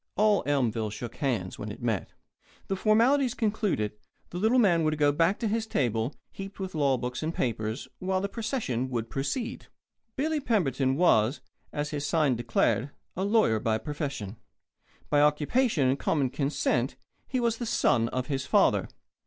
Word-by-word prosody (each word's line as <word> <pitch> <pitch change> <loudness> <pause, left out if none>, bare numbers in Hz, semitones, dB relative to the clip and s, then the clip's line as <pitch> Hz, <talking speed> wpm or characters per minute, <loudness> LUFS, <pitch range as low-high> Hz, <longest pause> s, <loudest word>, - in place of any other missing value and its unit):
All 210 -1 +4
Elmville 115 -6 +1
shook 115 +2 -7
hands 115 -10 -2
when 105 0 -5
it - - -9
met. 115 -6 -2 0.6
The 195 - +1
formalities 235 +6 +3
concluded, 205 - 0 0.4
the 175 - -4
little 220 +6 +3
man 175 -9 +4
would 155 0 +1
go 145 -1 +4
back 165 +7 +2
to 230 - -1
his 220 +1 -1
table, 120 - 0 0.2
heaped 195 +1 -8
with 190 -1 -4
law 140 -4 +2
books 125 +1 -4
and 160 +1 -1
papers, 110 0 -2
while 185 0 0
the 200 - -1
procession 205 - -2
would 115 -3 -3
proceed. 185 - -3 0.5
Billy 310 +3 0
Pemberton 140 - +1
was, 135 -6 +3 0.3
as 150 0 -3
his 145 -2 -3
sign 150 -3 +2
declared, 120 +2 +1 0.3
a 190 - -2
lawyer 200 - +3
by 110 -1 +1
profession. 135 -5 -5 0.7
By 145 -1 +5
occupation 150 - +2
and 135 +2 +1
common 140 -5 +1
consent 140 -3 0 0.3
he 260 - -1
was 235 -2 0
the 240 - -3
Son 120 - +2
of 130 0 -2
his 135 -2 -2
Father. - - +3
145 Hz, 165 wpm, -28 LUFS, 125-205 Hz, 0.7 s, By